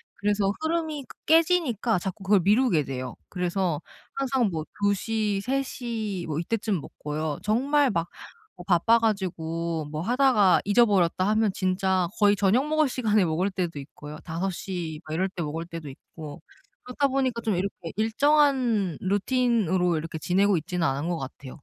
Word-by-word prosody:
그래서 205 -1 +1
흐름이 315 -3 -2
그 - - -13
깨지니까 310 - +3
자꾸 190 +2 -6
그걸 195 0 +4
미루게 210 - +3
돼요. 130 -2 -5
그래서 180 -3 -1 0.4
항상 265 -4 +1
뭐 160 -2 -3 0.2
2 205 0 +3
시, 210 0 -1
3 270 +4 0
시 220 -8 -4
뭐 155 -1 -2
이때쯤 205 -1 -1
먹고요. 150 +1 -4
정말 275 +7 +2
막 170 -3 -1 0.5
뭐 175 - -9
바빠 210 +6 +4
가지고 170 -6 -2
뭐 155 0 -3
하다가 240 -2 +4
잊어버렸다 200 -4 +3
하면 215 -1 +2
진짜 185 -1 +1
거의 205 -1 +5
저녁 215 +9 +2
먹을 310 -1 +2
시간에 215 -6 +2
먹을 175 +4 0
때도 175 -5 -3
있고요. 145 +2 -10
5 175 +3 -2
시 175 -4 -5
막 155 - -5
이럴 185 +3 +1
때 180 - -6
먹을 160 +2 -4
때도 165 -3 -8
있고 145 +2 -10 0.4
그렇다 265 +3 0
보니까 260 -3 -1
좀 220 -4 0
이렇게 180 -2 -4
일정한 235 - +2
루틴으로 200 -4 +1
이렇게 160 0 -5
지내고 190 +4 +2
있지는 175 +2 -2
않은 140 +5 -2
것 175 - -1
같아요. 135 +2 -9
195 Hz, 320 characters per minute, -26 LUFS, 165-235 Hz, 0.5 s, 거의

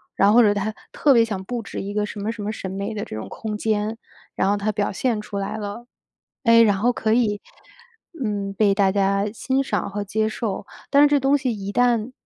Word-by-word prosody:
然 195 - +4
后 210 - +5
或 245 - +8
者 205 -3 +4
他 205 +2 -2 0.2
特 285 - +3
别 230 -2 +6
想 200 -4 -4
布 240 +4 -4
置 - - -6
一 200 +1 -5
个 210 0 0
什 210 - -7
么 210 +2 -2
什 230 -2 -8
么 205 +1 -2
审 190 -3 -6
美 200 +3 -4
的 205 - -3
这 - - -8
种 110 - -6
空 220 -2 -5
间， 215 +1 -1 0.3
然 190 - +1
后 205 - +2
他 205 +1 -1
表 205 -1 -1
现 225 +1 -1
出 210 -1 -6
来 195 +2 -3
了。 210 +3 -6 0.6
哎， 230 -1 +7
然 205 -3 +3
后 240 +4 +3
可 220 -2 0
以， 220 -4 +2 0.8
嗯， 205 -2 -2
被 200 0 +3
大 195 -1 +3
家 200 +1 +1
欣 260 +4 -1
赏 210 -7 -2
和 205 +1 -3
接 215 +2 0
受。 215 -3 -3 0.2
但 285 +1 +6
是 - - +7
这 290 0 +3
东 275 +2 +3
西 260 -2 -1
一 200 -1 -5
旦 240 +1 +2
210 Hz, 255 characters per minute, -22 LUFS, 200-230 Hz, 0.8 s, 或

